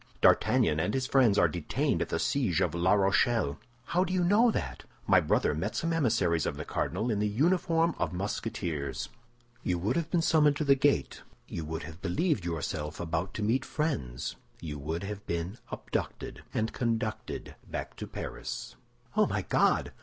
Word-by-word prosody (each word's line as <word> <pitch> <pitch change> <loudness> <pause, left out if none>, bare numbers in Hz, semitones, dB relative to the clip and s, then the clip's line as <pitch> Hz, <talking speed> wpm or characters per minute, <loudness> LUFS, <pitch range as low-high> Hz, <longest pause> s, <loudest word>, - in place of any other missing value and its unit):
D'Artagnan 75 - +4
and 90 +10 0
his 130 -1 0
friends 125 -6 +4
are 85 - +6
detained 85 0 -1
at - - -1
the - - 0
siege 120 - +1
of - - +1
La 85 +3 +3
Rochelle." 100 - +2 0.3
"How 180 +7 +2
do 180 - -3
you 185 -1 +2
know 210 +7 +5
that?" 65 - -3 0.2
"My - - +6
brother - - +2
met 80 +5 -2
some 165 0 0
emissaries 110 - +2
of - - -3
the - - -5
cardinal 110 +8 -1
in 105 - 0
the 105 - +2
uniform 165 - +2
of - - 0
Musketeers. 85 - -3 0.5
You 90 - 0
would 100 +8 0
have 165 -2 -1
been 170 -2 +1
summoned 150 -3 +4
to 150 - -1
the 140 -2 +6
gate; 140 +1 +1 0.3
you 85 - -4
would 80 +1 -4
have 80 +3 -9
believed 125 - 0
yourself 75 -2 -3
about 85 +2 -2
to 105 - -2
meet 120 +5 +2
friends; 70 - -2 0.2
you 75 -3 -6
would 80 +5 -3
have 100 0 -5
been 85 +6 -3
abducted, - - -4
and 110 0 -1
conducted 115 -3 -2
back - - -5
to - - -5
Paris." - - -6 0.4
"Oh, - - +4
my - - -1
God! - - +2
105 Hz, 180 wpm, -30 LUFS, -, 0.5 s, are